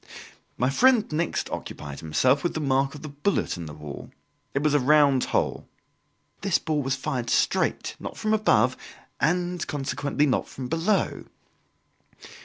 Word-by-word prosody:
My 125 +2 +1
friend 245 - +4
next 160 +2 -1
occupied 70 -1 -6
himself 125 - +2
with 175 - -1
the - - -1
mark 135 -1 +1
of 150 - -10
the - - -5
bullet 145 +8 -1
in 85 -3 -7
the 75 - -8
wall. 75 -2 -8 0.5
It 140 - +1
was 150 -1 +2
a 145 - +5
round 140 -1 +4
hole. - - -1 0.7
"This 195 -4 +2
ball 155 -2 -1
was 135 -1 0
fired 130 -3 -3
straight, - - +1
not - - -7
from 215 0 0
above, 130 - +3 0.4
and 175 +2 0
consequently, 145 +1 -1
not 135 - 0
from 130 -2 -7
below." 170 +5 0
145 Hz, 155 wpm, -26 LUFS, 130-165 Hz, 0.7 s, a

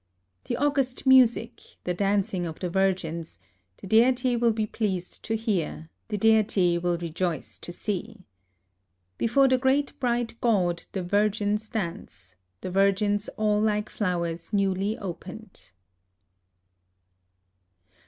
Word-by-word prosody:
" 90 0 -48
The - - -2
august 275 -3 0
music, 245 -3 +4 0.2
the 180 - -1
dancing 195 -1 0
of 160 - -7
the 180 -2 -3
virgins, 175 - -1 0.2
— 90 0 -46
the - - -11
Deity 245 +4 +3
will 235 -2 +2
he 215 -1 0
pleased 190 -5 -3
to 225 - -2
hear, 185 -7 -2 0.2
the 210 - -2
Deity 200 -5 +3
will 175 0 0
rejoice 170 0 -3
to - - -7
see. 210 +2 -5 0.5
" 90 0 -49
Before 270 +4 +4
the 260 -1 +3
great 270 +2 +1
bright 240 -2 -1
God 180 -7 +1
the 190 - -2
virgins 210 +2 0
dance, 165 - -6
— 90 0 -50
the 185 - -5
virgins 200 +2 +2
all 210 -1 +2
like 210 -1 0
flowers 170 -4 -2
newly 200 +1 0
opened.'''' 195 - -9
200 Hz, 135 wpm, -26 LUFS, 175-225 Hz, 0.5 s, music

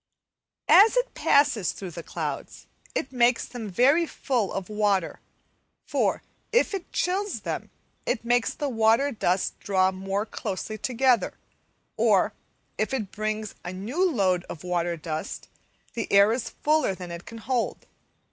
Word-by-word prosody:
As 435 +5 +7
it - - +1
passes 280 - +3
through 190 -3 -7
the 170 - -7
clouds, - - -5 0.3
it 265 - -2
makes 245 -1 +3
them 230 -4 -6
very 280 - +4
full 245 -11 -1
of 195 -2 -4
water, 205 -4 0 0.7
for, - - 0 0.3
if 470 -1 +3
it 380 -3 -5
chills 385 +3 -1
them, - - -4 0.4
it 235 -2 -1
makes 240 0 +2
the 295 - -2
water 230 +3 +3
dust 190 -5 0
draw 190 -1 +2
more 195 +2 -2
closely 215 0 -5
together; 250 +1 +2 0.6
or, - - +3 0.5
if 215 +5 0
it 215 -7 -4
brings 215 0 -3
a 175 - -5
new 220 - -2
load 185 - +1
of 170 - -9
water 175 -1 -1
dust, 155 0 -5 0.5
the 230 - -4
air 200 +2 +6
is 235 -1 -3
fuller 300 -9 +3
than 180 -2 -8
it 170 +1 -8
can 230 - -8
hold. 240 +1 -2
220 Hz, 145 wpm, -26 LUFS, 190-265 Hz, 0.7 s, As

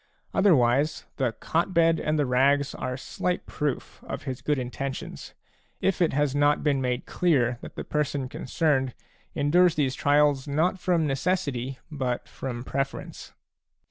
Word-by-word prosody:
Otherwise, 145 -6 +3
the 130 -4 +1
cot 170 - -1
bed 165 -1 +4
and 155 0 0
the 145 - +2
rags 140 +3 +3
are 130 0 -4
slight 180 +6 -3
proof 145 -4 -4
of - - -5
his 130 -2 -5
good 150 -1 +1
intentions, 130 +2 -5 0.4
if 195 -1 0
it 170 - +4
has 145 -1 +1
not 145 +1 +3
been 140 -3 +2
made 125 -1 -1
clear 130 -9 +1
that - - -10
the - - -4
person 145 -3 -1
concerned 135 -1 0 0.4
endures 170 +4 +4
these 135 -4 +1
trials 145 -1 +3
not 160 +6 +1
from 175 -3 +1
necessity 135 -4 -1
but 130 -5 -2
from 120 -3 -5
preference. 135 +1 -4
145 Hz, 145 wpm, -26 LUFS, 130-155 Hz, 0.4 s, bed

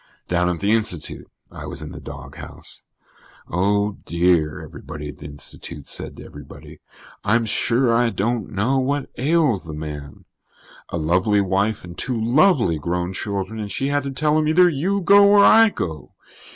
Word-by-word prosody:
Down 90 0 +1
at 85 -2 -2
the 100 +1 +1
Institute, 110 -7 -2 0.2
I - - -8
was - - -6
in - - -8
the - - -9
doghouse. - - -10 0.7
"Oh, 100 +3 0
dear," 85 -3 +1
everybody 75 +1 -8
at 70 - -11
the 75 - -8
Institute 75 +1 -9
said - - -4
to - - -10
everybody, 70 -1 -12 0.4
"I'm 115 +2 +2
sure 115 +3 +1
I 120 0 +3
don't 110 +1 -2
know 115 +7 0
what 140 +2 -2
ails 145 - +2
the 80 -2 -7
man. 75 -2 -8 0.6
A - - -3
lovely 90 +6 +2
wife 100 +2 0
and 90 -1 -10
two 120 +2 -3
lovely 120 - +3
grown 90 +3 -2
children 100 +2 -4
and 105 -2 -5
she 135 +8 -1
had 145 0 +1
to 140 0 -5
tell 150 +3 +1
him 155 - 0
'either 180 +3 +5
you 180 +6 0
go 200 +3 +6
or 200 -1 +7
I 225 +1 +7
go.' 80 - -6
105 Hz, 170 wpm, -21 LUFS, 85-135 Hz, 0.7 s, or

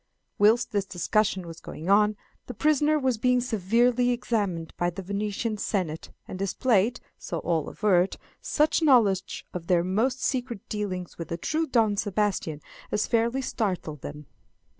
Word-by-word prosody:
Whilst 215 +4 +4
this 200 -2 0
discussion 190 +1 0
was 165 -1 -9
going 160 - -8
on, 210 +1 +4 0.3
the 250 - -7
prisoner 305 +3 +3
was 260 -5 0
being 250 +1 +3
severely 240 +2 +2
examined 205 -9 -1
by 175 - 0
the 175 +2 -7
Venetian 205 +3 -2
Senate, 180 -7 -2 0.2
and 185 - -7
displayed, 215 +3 +1 0.2
so 170 - -4
all 160 -2 -1
averred, 190 -3 +2 0.2
such 310 +2 +2
knowledge 225 - +3
of 170 -2 -6
their 175 -2 +3
most 225 +9 0
secret 245 -6 -2
dealings 185 -5 -4
with 165 - -5
the 170 - -4
true 315 - -1
Don 220 -6 +2
Sebastian 200 -7 -1 0.3
as 210 - +1
fairly 235 +3 +1
startled 180 - -3
them. 150 +1 -8
210 Hz, 150 wpm, -26 LUFS, 180-245 Hz, 0.3 s, Whilst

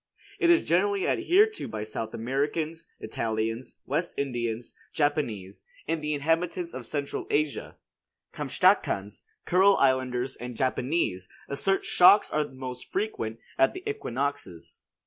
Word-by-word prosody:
It 345 - +3
is 345 -1 +5
generally 195 +3 +2
adhered 390 +5 +4
to - - -5
by 110 -1 -4
South 110 +1 -5
Americans, 150 +7 -2
Italians, 115 +2 -3
West 165 +5 -1
Indians, 120 -4 -3 0.2
Japanese, 120 -11 -1 0.2
and 165 - -1
the 150 0 -1
inhabitants 170 +4 -1
of 125 -3 -7
Central 145 -1 -3
Asia. 150 0 -1 0.6
Kamtschatkans, 100 +2 +1 0.2
Kurile 190 +3 +5
Islanders 130 -1 +1
and 125 -1 -7
Japanese, 130 - 0 0.2
assert 195 +8 0
shocks 190 +4 +6
are 150 -1 0
most 130 -1 -8
frequent 115 - -2 0.2
at 335 - +4
the 370 +3 -7
equinoxes. 135 - -4
140 Hz, 125 wpm, -27 LUFS, 120-170 Hz, 0.6 s, shocks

